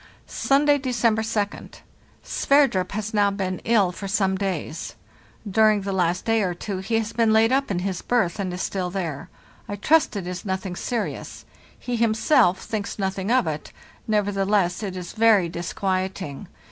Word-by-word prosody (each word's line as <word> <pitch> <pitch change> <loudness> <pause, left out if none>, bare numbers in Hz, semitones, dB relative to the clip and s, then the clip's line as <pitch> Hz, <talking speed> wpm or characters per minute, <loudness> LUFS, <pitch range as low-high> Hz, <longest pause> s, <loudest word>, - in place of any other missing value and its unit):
"Sunday, 285 +1 +2
December 240 -4 +1
2d. 210 -2 -3 0.5
Sverdrup 275 -11 +2
has 215 +1 -4
now 205 -1 +3
been 190 -2 -3
ill 210 -6 +3
for 195 +2 -7
some 195 -1 +1
days; 185 -5 -4 0.5
during 215 +1 +4
the 195 0 -3
last 180 -1 0
day 225 -1 +2
or 180 -3 -1
two 195 +1 -4
he 220 +4 -1
has 225 0 -2
been 230 -1 +3
laid 220 +2 +4
up 275 +1 +1
in 195 - -1
his 185 0 -2
berth, 215 -6 0
and 190 -2 -2
is 180 +1 -4
still 185 -2 -2
there. 170 -7 -4 0.4
I 205 - -3
trust 300 +7 +3
it 195 -3 -3
is 180 0 -5
nothing 190 -2 -3
serious; 235 +3 -4 0.3
he 245 -1 -3
himself 220 - +3
thinks 210 -2 -4
nothing 190 0 -2
of 255 -4 +3
it, 155 -2 -4 0.4
nevertheless 200 -3 +1
it 190 -3 -4
is 180 -1 -7
very 220 -5 +4
disquieting. 185 -2 -3
200 Hz, 165 wpm, -24 LUFS, 185-220 Hz, 0.5 s, during